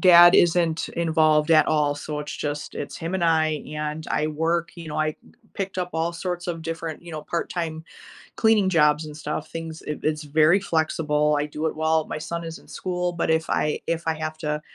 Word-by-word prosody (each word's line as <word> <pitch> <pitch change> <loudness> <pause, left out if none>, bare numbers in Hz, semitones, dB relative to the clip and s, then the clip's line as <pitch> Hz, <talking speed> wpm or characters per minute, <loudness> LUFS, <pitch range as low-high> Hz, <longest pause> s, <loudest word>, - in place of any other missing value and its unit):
dad 175 -2 +9
isn't 170 -2 +3
involved 160 -2 +2
at 155 -1 +6
all, 150 -2 +2
so, 150 +1 -5
it's 150 - -6
just 145 0 -4
it's 140 0 -5
him 165 +3 -4
and 185 -2 0
I, 155 -2 +2
and 150 +1 -4
I 155 - +1
work, 165 +2 0
you 170 -2 -8
know 150 - -4
I 155 0 0 0.4
picked 195 -1 -4
up 180 -1 -2
all 165 +1 0
sorts 180 +1 -4
of 165 -1 -3
different, 165 0 -5
you 170 - -10
know, 155 -1 -5
part 170 - -3
time 160 -2 -3 0.6
cleaning 220 -4 +4
jobs 150 -3 +3
and 150 -1 -9
stuff, 150 0 -4
things 165 -1 -6
i 150 - -2
it's 155 0 0
very 155 +6 +4
flexible. 150 -3 +1
I 150 - 0
do 150 +2 -4
it - - -3
while 160 0 +1
my - - -4
son 170 +2 -4
is 165 0 -6
in - - -21
school, 180 -1 -2
but 170 - -2
if 160 0 +1
I 150 - +1
if 165 0 -1
I 160 - +3
have 155 0 -4
to, 150 -1 -2
160 Hz, 215 wpm, -24 LUFS, 150-170 Hz, 0.6 s, dad